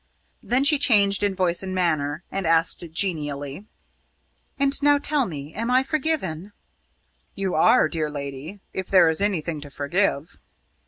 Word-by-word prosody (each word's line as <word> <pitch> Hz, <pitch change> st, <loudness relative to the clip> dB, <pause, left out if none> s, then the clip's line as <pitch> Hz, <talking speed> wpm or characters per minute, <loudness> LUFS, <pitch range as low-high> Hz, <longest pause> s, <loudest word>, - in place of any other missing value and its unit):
Then 250 Hz, +3 st, +1 dB
she 290 Hz, 0 st, +6 dB
changed 200 Hz, -7 st, +4 dB
in 200 Hz, -2 st, 0 dB
voice 180 Hz, -2 st, 0 dB
and 190 Hz, -1 st, -5 dB
manner, 155 Hz, -3 st, -1 dB
and 195 Hz, -3 st, -3 dB
asked 165 Hz, +1 st, +2 dB
genially: 150 Hz, -2 st, -2 dB, 0.9 s
"And 275 Hz, +1 st, +1 dB
now 290 Hz, 0 st, +4 dB
tell 285 Hz, -3 st, 0 dB
me, 150 Hz, -2 st, -8 dB
am 230 Hz, +3 st, -3 dB
I 255 Hz, +1 st, +3 dB
forgiven?" 265 Hz, -, -3 dB, 0.8 s
"You 195 Hz, -2 st, -3 dB
are, 155 Hz, -, +4 dB
dear 155 Hz, -1 st, -2 dB
lady 145 Hz, +6 st, -8 dB
if 190 Hz, -1 st, -5 dB
there 185 Hz, -3 st, +5 dB
is 160 Hz, +3 st, -1 dB
anything 170 Hz, -6 st, -1 dB
to 145 Hz, -, -10 dB
forgive." 150 Hz, +2 st, -1 dB
185 Hz, 150 wpm, -23 LUFS, 155-210 Hz, 0.9 s, she